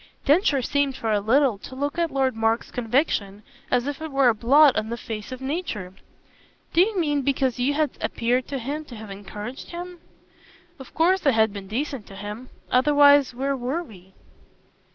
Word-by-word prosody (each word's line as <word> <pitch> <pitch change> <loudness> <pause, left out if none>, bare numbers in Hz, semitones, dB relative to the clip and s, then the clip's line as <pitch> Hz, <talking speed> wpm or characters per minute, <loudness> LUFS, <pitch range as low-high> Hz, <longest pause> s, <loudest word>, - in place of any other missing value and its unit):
Densher 290 -3 +3
seemed 285 +1 0
for 225 - -2
a 210 - +2
little 235 +1 +2
to 260 - -10
look 285 +4 -3
at 335 -1 +1
Lord 265 -3 0
Mark's 225 +1 0
conviction 225 -5 -1 0.3
as 250 0 +1
if 285 +1 -4
it 315 - -4
were 270 -2 +4
a - - +3
blot 270 +6 +5
on 215 0 -1
the 235 - -3
face 220 0 -7
of 255 0 -7
nature. 265 - -4 0.8
"Do 340 - +5
you 410 +2 +1
mean 295 -4 +1
because 265 -2 0
you 275 +4 +1
had 305 -1 +1
appeared 245 +2 0
to 280 - -3
him 280 +5 -4
to 250 - -11
have 215 -2 -9
encouraged 205 +5 -8
him?" 350 0 -8 0.8
"Of 265 - -12
course 350 +1 +2
I - - +6
had 220 -2 +2
been 200 -2 -8
decent 255 +1 -4
to 195 - -12
him. 210 +5 -7 0.2
Otherwise 285 0 +5
where 275 +2 -1
WERE 265 +7 -2
we?" 190 - -16
260 Hz, 190 wpm, -24 LUFS, 225-290 Hz, 0.8 s, I